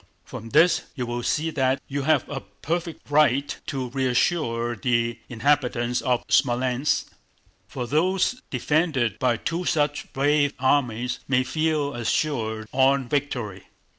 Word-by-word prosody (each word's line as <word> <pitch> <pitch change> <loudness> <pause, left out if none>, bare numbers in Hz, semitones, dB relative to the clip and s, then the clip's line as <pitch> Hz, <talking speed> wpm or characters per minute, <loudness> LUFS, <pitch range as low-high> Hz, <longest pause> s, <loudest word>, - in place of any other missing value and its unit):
From 115 - -8
this 170 +9 +4
you 125 -4 -3
will 120 0 -3
see 155 +6 0
that 135 -3 +1
you 140 +1 -3
have 155 +3 +2
a 140 - -4
perfect 160 - -5
right 145 -2 +3
to 130 -3 -3
reassure 125 -2 0
the 115 0 0
inhabitants 125 -1 +1
of 125 -2 0
Smolénsk, 125 +1 +1 0.6
for 125 -2 -5
those 185 - +1
defended 130 - 0
by 125 -3 +2
two 165 +9 -3
such 150 -4 0
brave 145 +1 +2
armies 125 -3 +1
may 130 -1 +2
feel 155 0 0
assured 115 -3 -1
of 135 +1 +4
victory." 120 -10 -2
135 Hz, 130 wpm, -24 LUFS, 120-150 Hz, 0.6 s, this